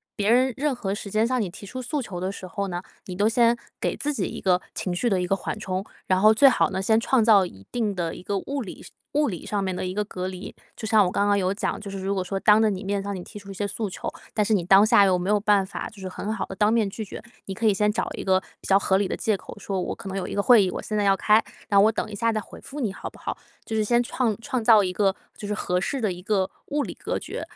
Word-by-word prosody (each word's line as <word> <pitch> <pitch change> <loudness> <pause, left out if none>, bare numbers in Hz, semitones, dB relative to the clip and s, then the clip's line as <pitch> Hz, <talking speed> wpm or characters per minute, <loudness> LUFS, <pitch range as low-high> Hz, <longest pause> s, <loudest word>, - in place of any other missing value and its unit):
别 205 +1 +1
人 255 +2 +4
任 290 0 +1
何 200 -5 -3
时 200 -2 -7
间 215 +1 +2
向 255 +1 0
你 200 -6 -2
提 200 +2 -11
出 255 +6 -6
诉 295 +3 -2
求 190 -7 -6
的 185 +2 -2
时 190 -2 -8
候 200 +2 -3
呢， 175 -1 -3 0.2
你 180 - -6
都 205 +3 +3
先 235 +1 +4 0.2
给 - - -1
自 295 - -2
己 210 -10 -1
一 - - -6
个 180 -2 +3
情 185 - -3
绪 240 - 0
的 190 -5 +2
一 180 - -2
个 195 - +2
缓 210 - -5
冲。 190 0 -3 0.2
然 185 0 +3
后 215 +2 +7
最 275 +4 +7
好 245 - +2
呢， 190 - -2
先 220 +3 +3
创 235 0 +2
造 205 -4 +6
一 95 - -12
定 225 -4 0
的 170 -3 -3
一 - - -10
个 200 0 -1
物 280 +5 -4
理 190 - -9
上 - - -13 0.2
物 295 -1 +2
理 175 -5 -6
上 205 -2 -1
面 190 -1 -2
的 - - -3
一 185 - -3
个 210 - +1
隔 185 -2 -5
离。 185 +1 -7 0.2
就 220 - -7
像 220 -1 +5
我 180 - +1
刚 200 - +1
刚 205 - +4
有 185 -1 +1
讲， 200 - -2
就 205 - -7
是 195 - -6
如 195 +1 -1
果 190 -2 -1
说 195 +1 -3
当 210 +1 +6
着 220 - +4
你 195 -1 -3
面 200 0 -1
向 200 0 -4
你 180 - -6
提 210 - -10
出 200 -1 -13
一 - - -6
些 205 +2 -2
诉 205 +1 -3
求， 185 - -6 0.3
但 210 -2 +1
是 220 - +1
你 195 -4 +2
当 195 +4 +6
下 205 -2 +6
又 185 -2 +3
没 180 +1 -3
有 210 0 +4
办 205 -2 +3
法 - - -6
就 210 - -16
是 190 - -5
很 200 +3 -4
好 220 - -2
地 190 - -8
当 210 +3 +3
面 225 -3 +2
拒 220 +3 -6
绝。 205 - -9 0.2
你 195 - -5
可 225 - -3
以 210 - +5
先 210 +1 +2
找 225 +2 -2
一 - - -5
个 190 -1 +3 0.2
比 - - -10
较 195 - +6
合 190 -1 +2
理 200 - +1
的 - - -2
借 215 -2 +1
口， - - -10
说： 195 -2 -3
“我 - - -3
可 - - -10
能 195 - -4
有 195 - -3
一 - - -5
个 200 - +1
会 235 -3 +7
议， 185 - 0
我 - - -4
现 215 - -4
在 210 - +2
要 195 -1 +4
开， 215 +3 +4 0.3
那 200 -2 +5
我 210 +2 +6
等 - - -3
一 - - -5
下 230 +3 +1
再 220 - -1
回 210 - -11
复 290 - -8
你， 220 -8 -1
好 - - -6
不 - - -18
好？” - - -4 0.3
就 220 - -4
是 215 - +2
先 240 +3 +3
创 235 -3 -1
创 240 0 -2
造 220 -3 +7
一 180 - -2
个 195 0 +2 0.2
就 205 - -7
是 210 - -1
合 180 -3 -1
适 270 +7 -2
的 215 -5 0
一 180 - -10
个 195 -1 0 0.2
物 290 0 0
理 - - -6
隔 - - -3
绝， - - -6
205 Hz, 345 characters per minute, -25 LUFS, 190-220 Hz, 0.3 s, 后